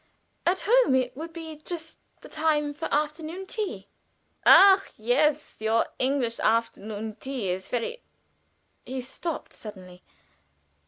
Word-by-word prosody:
"At 370 +2 +2
home 480 - +5
it 255 -1 0
would 325 +4 -7
be 320 -1 -8
just 320 +1 -7 0.2
the - - -11
time 300 -2 0
for 290 - -5
afternoon 310 +5 -2
tea." 380 - -4 0.6
"Ah, 390 0 +9
yes! 285 +7 +1
Your 220 +1 +2
English 255 -3 0
afternoon 220 -1 -1
tea 255 -6 -4
is 185 +1 -3
very 250 - -3 0.4
" - - -44
He 260 0 -3
stopped 305 +6 -5
suddenly. 185 -4 -10
280 Hz, 125 wpm, -27 LUFS, 230-320 Hz, 0.6 s, Ah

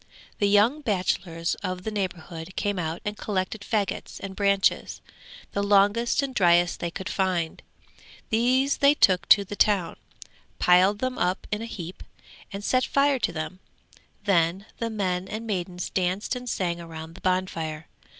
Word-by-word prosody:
The 205 - +3
young 220 +9 +4
bachelors 180 - -1
of 185 -2 -4
the 220 - -3
neighbourhood 180 -4 -5
came 205 -2 -1
out 160 0 -3
and 205 0 -2
collected 205 0 -3
faggots 205 -2 -2
and 195 -1 -7
branches, 200 -1 +1 0.5
the 200 - -1
longest 205 +6 +3
and 270 -1 -3
driest 175 -4 +3
they 170 - -2
could 190 +3 -6
find. 185 -5 -1 0.7
These 255 +5 +2
they 285 +1 +5
took 185 -9 +3
to 200 -2 +7
the 205 - -6
town, 200 -5 +2 0.6
piled 185 +3 +5
them 255 0 -2
up 180 +1 0
in 210 0 -1
a - - -4
heap, 180 -5 -7 0.5
and 200 0 -6
set 255 +4 +2
fire 280 -1 +2
to - - 0
them; 165 +3 -5 0.6
then 185 0 +2
the 230 - -1
men 190 -4 -2
and 215 +3 -5
maidens 180 -4 -3
danced 185 +6 -1
and 250 0 -5
sang 175 -5 -1
round 165 -1 -8
the 185 - -14
bonfire. 165 -4 -2
195 Hz, 160 wpm, -26 LUFS, 180-215 Hz, 0.7 s, to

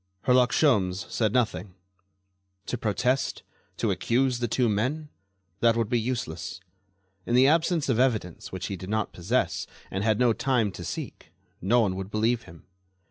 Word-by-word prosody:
Herlock 125 -1 +4
Sholmes 100 -11 +2
said 110 -3 +1
nothing. 110 -5 -1 0.9
To - - -2
protest? 125 +3 0 0.3
To - - 0
accuse 125 +1 +1
the 120 - 0
two 120 +2 +1
men? 130 +9 -1 0.5
That 115 -1 +4
would 115 -2 0
be 120 - +2
useless. 90 -8 -4 0.7
In 120 - +1
the 130 +1 +6
absence 160 +2 +2
of 125 -4 +1
evidence 110 -10 0
which 95 -1 -5
he 100 - -3
did 95 +1 -8
not 110 0 -1
possess 105 +9 -1 0.2
and 95 +1 -2
had 110 -1 +2
no 120 -1 +4
time 120 -5 +1
to 90 -1 -8
seek, - - -7 0.3
no 120 +7 +3
one 95 -4 0
would 95 0 -5
believe 110 +2 0
him. 80 -2 -15
115 Hz, 165 wpm, -27 LUFS, 100-125 Hz, 0.9 s, the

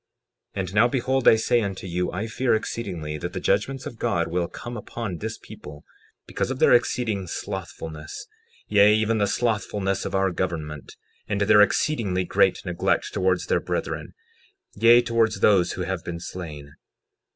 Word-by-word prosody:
60:14 - - -3
And 90 0 -6
now 110 +3 +5
behold, 130 +1 0
I - - +9
say 120 +2 +2
unto 95 -3 -4
you, 90 0 -2
I 95 +4 -3
fear 115 +2 +1
exceedingly 90 -9 -4
that 90 +3 -5
the 95 - -3
judgments 115 +9 0
of 115 - -8
God 85 -3 0
will 85 0 -1
come 120 +6 -8
upon 105 -5 -5
this 110 +1 -4
people, 75 0 -12 0.4
because - - -3
of 135 - -3
their - - +5
exceeding 115 -5 +1
slothfulness, 80 -1 -6 0.4
yea, 105 0 +5
even 110 +1 +1
the 100 - +2
slothfulness 105 -4 -1
of - - -3
our 95 0 +2
government, 80 -5 -4 0.3
and 100 0 -1
their 105 +1 +6
exceedingly 105 -4 +1
great - - +2
neglect 90 -1 0
towards 95 -1 +1
their - - +1
brethren, - - -4 0.6
yea, 120 +1 +6
towards 115 -1 +1
those 95 -4 +4
who 90 - -3
have 95 -2 -3
been 85 -1 -5
slain. 75 -5 -8
100 Hz, 165 wpm, -24 LUFS, 90-115 Hz, 0.6 s, I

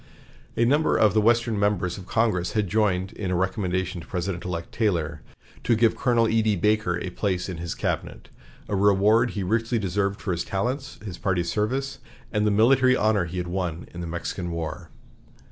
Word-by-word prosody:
A 115 - +4
number 145 +5 +3
of 105 -3 +4
the 110 - +3
Western 115 -1 +2
members 100 -3 +1
of 95 -1 -10
Congress 110 -6 +1
had 105 -2 +1
joined 95 -2 0
in 100 -3 -4
a 90 - 0
recommendation 95 -1 -1
to - - -13
President 90 0 -3
elect 85 -2 -5
Taylor 85 -8 -1 0.4
to 120 - +3
give 115 0 +3
Colonel 120 -2 +2
E.D. 110 -1 +2
Baker 105 -2 +1
a 90 - -5
place 95 -2 -1
in 90 -3 -5
his 85 0 -4
cabinet, - - -3 0.4
a 100 - -1
reward 105 +4 +4
he 100 - -1
richly 115 +5 0
deserved 100 0 -1
for 95 - -3
his 85 -1 -1
talents, 125 +10 -3
his 95 -4 -7
party 90 -3 0
service, 110 +10 -2 0.3
and 105 0 +1
the - - +4
military 130 +5 +4
honor 105 -5 +2
he 85 +2 -6
had 90 -1 -2
won 90 -2 -3
in 85 - -6
the 85 - -4
Mexican 85 +1 -4
War. 85 0 -5
100 Hz, 190 wpm, -25 LUFS, 90-110 Hz, 0.4 s, A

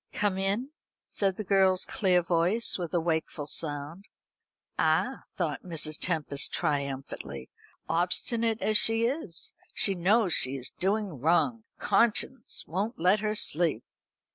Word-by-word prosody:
"Come 200 -2 0
in," 205 +8 -1 0.3
said 195 -2 -1
the 215 - -4
girl's 190 -2 +2
clear 180 -4 +1
voice 175 +7 +1
with 175 -3 -4
a - - +3
wakeful 160 -2 -2
sound. 150 +5 -3 0.7
"Ah!" - - +1
thought - - -2
Mrs. 155 -3 -3
Tempest 155 -5 +2
triumphantly, 140 - -3 0.4
"obstinate 225 +7 +1
as 215 -1 +5
she 225 +1 +3
is, 235 - -4 0.2
she 195 - +4
knows 190 +1 +2
she 130 +2 +2
is 130 -2 -5
doing 195 - -2
wrong. 175 - +1
Conscience 235 +2 0
won't 200 +8 -3
let 185 +5 +3
her 215 0 -2
sleep." 160 - +1
185 Hz, 130 wpm, -28 LUFS, 160-215 Hz, 0.7 s, as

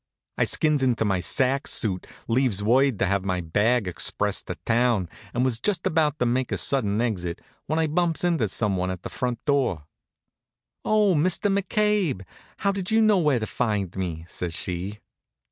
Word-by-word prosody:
I - - +4
skins 155 -2 +1
into 120 -4 +1
my 95 -3 +1
sack 135 +9 +1
suit, 95 -5 -1 0.2
leaves 115 -4 +1
word 130 +2 +3
to - - +1
have 100 0 0
my 95 -2 -1
bag 105 +7 +1
expressed 100 +3 -1
to - - -4
town, 115 -5 +2 0.2
and 125 +1 0
was 120 -4 0
just 185 +5 -1
about 155 -2 +2
to 125 - +1
make 125 +1 0
a - - 0
sudden 110 -7 0
exit 90 -8 -2 0.3
when 155 - 0
I 160 - +2
bumps 165 +2 0
into 165 -11 +2
some 100 0 0
one 90 0 -1
at 95 -1 -5
the - - -5
front 125 -2 -3
door. 130 - +1 1.0
"Oh, 210 -3 +3
Mr. 185 +5 +1
McCabe! 200 - +1 0.3
How 200 - +1
did 195 -2 -3
you 220 - +3
know 215 -3 +4
where 150 -6 +3
to 110 - -2
find 105 -6 -2
me?" 85 -4 -4
says 85 -2 -5
she. 95 +5 -4
120 Hz, 180 wpm, -25 LUFS, 100-155 Hz, 1.0 s, I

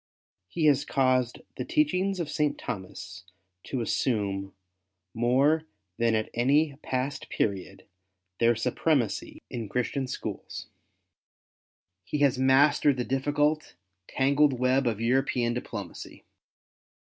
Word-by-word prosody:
He 155 - -1
has 145 -3 +4
caused 130 -2 +1 0.2
the 125 - -2
teachings 185 +8 +1
of 170 - -2
St. 150 0 0
Thomas 95 -4 -7 0.4
to 130 - -3
assume 100 -5 -1 0.6
more 135 +7 +2 0.3
than 115 -1 +3
at 110 0 -1
any 140 +5 +2
past 130 0 -3
period, 95 -1 -2 0.5
their 120 0 +4
supremacy 130 -1 -1
in 115 -4 -5
Cluistian 125 +2 -1
schools. - - -6 1.4
He 95 - -3
has 135 -3 +3
mastered 140 +1 +4
the 125 - -1
difficult, 145 - 0 0.3
tangled 140 +2 +3
web 130 +1 +2
of 110 -3 -1
European 120 0 +1
diplomacy. 105 -6 -7
130 Hz, 110 wpm, -28 LUFS, 115-145 Hz, 1.4 s, has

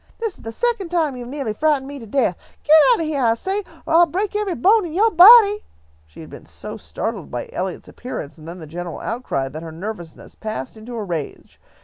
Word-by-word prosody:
"This 450 -4 -3
is - - -20
the 225 - -6
second 465 - -1
time 320 -6 0
you 245 -1 -7
have 245 - -9
neahly 270 -7 -3
frightened 295 0 +1
me 285 0 -7
to 230 - -11
death! 225 -5 +1 0.3
Get 305 - +6 0.2
out 475 - +3
of - - -1
heah, 300 -3 -2
I 225 -1 +4
say, 380 - -2 0.3
or - - -2
I'll 340 +1 +6
break 390 +6 -3
every 415 -4 -1
bone 415 +6 +4
in 335 -3 -6
yo' 435 +6 +3
body!" 420 +3 +8 0.4
She 75 - -13
had - - -11
been - - -11
so - - -9
startled - - -5
by 120 -1 -6
Eliot's 185 0 -4
appearance 165 - -7
and 155 - -12
then 170 +2 -7
the 165 - -9
general 170 +2 -6
outcry, 225 - -3
that 155 +4 -8
her 165 -1 -8
nervousness 175 -1 -8
passed 215 -10 -6
into 225 +2 -9
a 220 - -3
rage. 170 -7 -6
255 Hz, 235 wpm, -21 LUFS, -, 0.4 s, body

